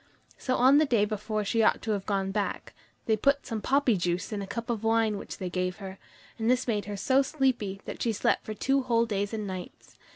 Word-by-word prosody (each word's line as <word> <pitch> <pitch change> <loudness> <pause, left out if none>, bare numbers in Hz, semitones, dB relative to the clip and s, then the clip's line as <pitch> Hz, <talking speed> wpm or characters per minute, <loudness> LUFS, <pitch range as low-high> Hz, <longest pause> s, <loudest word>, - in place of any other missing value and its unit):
So 255 - 0
on 265 +4 +6
the 310 - +3
day 230 -5 +3
before 215 0 -3
she 225 +3 +1
ought 220 - +3
to 220 - -1
have 200 -2 -2
gone 195 -2 0
back, 205 0 -3 0.3
they 220 - +3
put, 280 +6 +1
some 225 -2 -4
poppy 270 -2 +3
juice 175 +1 -1
in 205 - -3
a 195 - -5
cup 230 +4 -4
of 225 -2 -3
wine 225 -2 +2
which - - -8
they 185 - -4
gave 180 0 -2
her, 190 -1 -8 0.4
and 225 +1 +1
this 255 +1 +2
made 210 -3 0
her 205 0 -5
so 260 +7 +3
sleepy 260 -9 -1
that - - -7
she 235 - +1
slept 210 - +1
for 215 - -6
two 275 +5 +1
whole 235 -2 +2
days 205 -2 -2
and 215 -2 -3
nights. 185 -2 -8
215 Hz, 235 wpm, -28 LUFS, 200-240 Hz, 0.4 s, on